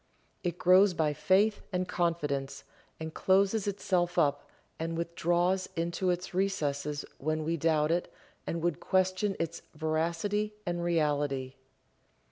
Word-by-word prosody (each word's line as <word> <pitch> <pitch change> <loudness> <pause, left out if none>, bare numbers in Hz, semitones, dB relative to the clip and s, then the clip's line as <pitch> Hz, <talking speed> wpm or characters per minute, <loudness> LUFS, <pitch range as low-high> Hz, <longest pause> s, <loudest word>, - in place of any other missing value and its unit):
It 175 -2 -2
grows 185 +1 +5
by 155 -2 +1
faith 200 +7 +2
and 180 -1 -1
confidence, 145 -6 -1 0.4
and 160 0 -5
closes 195 +2 +2
itself 180 -3 0
up, 145 0 +1 0.3
and 165 +1 -2
withdraws 175 +2 0
into 170 +2 -1
its 180 +1 -2
recesses 150 -6 -1
when 155 +2 -1
we 165 +2 0
doubt 155 -1 +2
it 175 +1 0 0.4
and 165 0 -2
would 175 -3 0
question 185 +2 +1
its 165 0 -3
veracity 170 +7 -1
and 175 -1 -2
reality. 145 -6 0
170 Hz, 125 wpm, -30 LUFS, 155-185 Hz, 0.4 s, grows